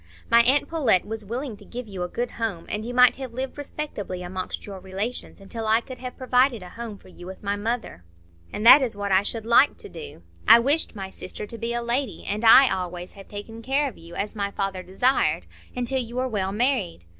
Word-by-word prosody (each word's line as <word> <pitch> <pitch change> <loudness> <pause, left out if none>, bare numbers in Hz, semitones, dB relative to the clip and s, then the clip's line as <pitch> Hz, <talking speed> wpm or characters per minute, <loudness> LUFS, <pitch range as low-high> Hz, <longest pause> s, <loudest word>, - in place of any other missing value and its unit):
My 235 0 +8
aunt 265 +5 +3
Pullet 260 - +2
was 220 0 -4
willing 245 +2 -4
to - - -15
give 245 -1 -7
you 195 -3 -7
a 180 - -1
good 240 +7 -3
home, 215 -8 -3
and 210 +1 -3
you 235 - -5
might 250 0 +5
have 260 -3 -7
lived 260 +1 -4
respectably 275 -11 -5
amongst 185 +1 -5
your 195 -2 -8
relations, 195 +7 -5
until 220 +3 -6
I 220 +1 +4
could 255 +2 -10
have 250 -1 -7
provided 255 -4 +2
a 180 - -10
home 230 0 -7
for - - -19
you 175 -1 -12
with 190 +2 -10
my 200 0 0
mother. 215 - -3 0.5
And 215 - -4
that 265 +5 +10
is 240 -5 0
what 200 -1 -3
I 190 0 +5
should 220 +2 -4
like 235 +5 +5
to - - -10
do. 155 - -10 0.2
I - - +10
wished 280 +3 +1
my 190 -2 -6
sister 190 - -7
to 230 +3 -8
be 235 +1 -2
a 240 - -2
lady, 235 - -2
and 210 +3 -3
I 245 +4 +9
always 180 -1 -5
have 195 -1 -13
taken 215 +2 -8
care 275 +4 +1
of 255 - -7
you, 170 +1 -12
as 210 +2 -3
my 200 -1 -1
father 195 -2 -3
desired, 195 +9 +1 0.3
until 250 +2 0
you 235 0 -8
were 255 +1 0
well 195 -5 -1
married. 210 - 0
225 Hz, 230 wpm, -25 LUFS, 195-250 Hz, 0.5 s, that